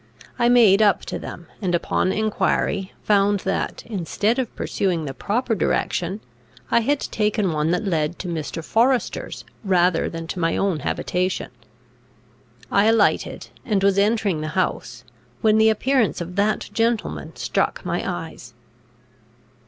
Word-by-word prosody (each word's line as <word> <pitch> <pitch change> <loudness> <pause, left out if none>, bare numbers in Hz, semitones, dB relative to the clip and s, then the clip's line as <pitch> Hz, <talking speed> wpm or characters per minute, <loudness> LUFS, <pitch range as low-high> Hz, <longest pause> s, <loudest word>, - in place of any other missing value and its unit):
I 240 - +4
made 220 -5 +6
up 205 -4 +4
to - - -4
them, 170 - -8 0.2
and 180 -3 +1
upon 180 +2 0
enquiry 210 -2 0
found 205 -1 +3
that, 190 - -2
instead 210 +3 -1
of 250 -3 -3
pursuing 175 -5 -1
the 135 - -4
proper 225 - -1
direction, 190 -1 -1 0.5
I - - +5
had 275 +5 0
taken 210 -3 0
one 155 0 0
that 180 +5 0
led 165 -3 0
to 185 - -6
Mr. 165 -1 -4
Forester's 245 +3 0 0.2
rather 180 -3 +2
than 165 0 -6
to 185 - -4
my 165 -1 +1
own 190 -6 0
habitation. 180 +5 -2 1.2
I 200 - +4
alighted, 225 -1 +2
and 205 -4 0
was 200 0 +3
entering 205 -5 +1
the 155 - -3
house, 125 -9 -2 0.4
when 220 0 +4
the 220 0 +6
appearance 245 +1 +1
of 175 +1 -6
that 210 +1 0
gentleman 230 0 -1
struck - - -1
my - - -1
eyes. 165 -8 -6
195 Hz, 145 wpm, -22 LUFS, 175-220 Hz, 1.2 s, made